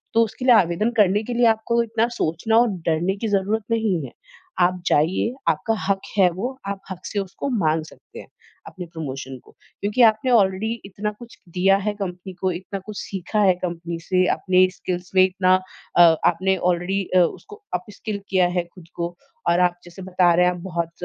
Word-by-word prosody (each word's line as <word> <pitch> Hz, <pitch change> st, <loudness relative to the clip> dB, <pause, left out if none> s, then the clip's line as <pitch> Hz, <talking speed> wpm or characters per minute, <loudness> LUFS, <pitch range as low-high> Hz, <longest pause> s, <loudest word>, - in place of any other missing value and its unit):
तो 230 Hz, -, +6 dB
उसके 240 Hz, +3 st, -5 dB
लिए 250 Hz, -, +7 dB
आवेदन 200 Hz, +4 st, +2 dB
करने 205 Hz, +1 st, +4 dB
के 245 Hz, -, -4 dB
लिए 240 Hz, 0 st, +3 dB
आपको 225 Hz, +1 st, +2 dB
इतना 230 Hz, 0 st, 0 dB
सोचना 200 Hz, +8 st, +1 dB
और 240 Hz, -, +4 dB, 0.2 s
डरने 170 Hz, +4 st, +1 dB
की -, -, +1 dB
ज़रूरत 205 Hz, +2 st, 0 dB
नहीं 205 Hz, -10 st, 0 dB
है। 120 Hz, -, -10 dB, 0.5 s
आप 180 Hz, 0 st, +2 dB
जाइए, 175 Hz, +10 st, +2 dB, 0.2 s
आपका 225 Hz, -, 0 dB
हक 195 Hz, -1 st, +1 dB, 0.2 s
है 185 Hz, -2 st, +6 dB
वो 245 Hz, +9 st, -4 dB
आप 200 Hz, -1 st, -3 dB
हक 185 Hz, 0 st, -8 dB
से 205 Hz, -, -2 dB
उसको 195 Hz, +8 st, -4 dB
माँग 160 Hz, -9 st, +1 dB
सकते -, -, -14 dB
हैं -, -, -11 dB, 0.4 s
अपने 180 Hz, -2 st, -8 dB
प्रमोशन 135 Hz, -5 st, -7 dB
को, -, -, -21 dB, 0.3 s
क्योंकि 210 Hz, +5 st, 0 dB
आपने 220 Hz, +3 st, +4 dB
ऑलरेडी 205 Hz, 0 st, +2 dB
इतना 205 Hz, +2 st, -4 dB
कुछ 235 Hz, -1 st, -13 dB, 0.2 s
दिया 195 Hz, +2 st, +4 dB
है 205 Hz, +1 st, -2 dB
कंपनी, 190 Hz, -2 st, -6 dB, 0.2 s
इतना 190 Hz, +2 st, -6 dB
कुछ 215 Hz, -2 st, -8 dB
सीखा 195 Hz, +2 st, -3 dB
है 190 Hz, -2 st, +5 dB
कंपनी 170 Hz, -1 st, -4 dB
से, 185 Hz, +1 st, +1 dB
अपने 185 Hz, -1 st, +3 dB
स्किल्स 180 Hz, 0 st, -5 dB
में 185 Hz, -, +7 dB
इतना 185 Hz, 0 st, +2 dB, 0.4 s
अ, -, -, +8 dB, 0.2 s
आपने 190 Hz, +3 st, +2 dB, 0.2 s
ऑलरेडी 185 Hz, +3 st, -1 dB
अ, -, -, +7 dB
उसको 420 Hz, -, -2 dB
अपस्किल 200 Hz, +2 st, -5 dB
किया 185 Hz, -2 st, +3 dB
है 175 Hz, -, +2 dB
खुद 175 Hz, -3 st, -15 dB
को 170 Hz, 0 st, -4 dB, 0.3 s
और 170 Hz, +1 st, +3 dB
आप 180 Hz, -1 st, +3 dB
जैसे 175 Hz, +2 st, -12 dB
बता 180 Hz, -2 st, +2 dB
रहे 180 Hz, +1 st, +4 dB
हैं 180 Hz, -, +2 dB
आप 175 Hz, -, -9 dB
बहुत 170 Hz, 0 st, -2 dB
190 Hz, 195 wpm, -22 LUFS, 175-215 Hz, 0.5 s, अ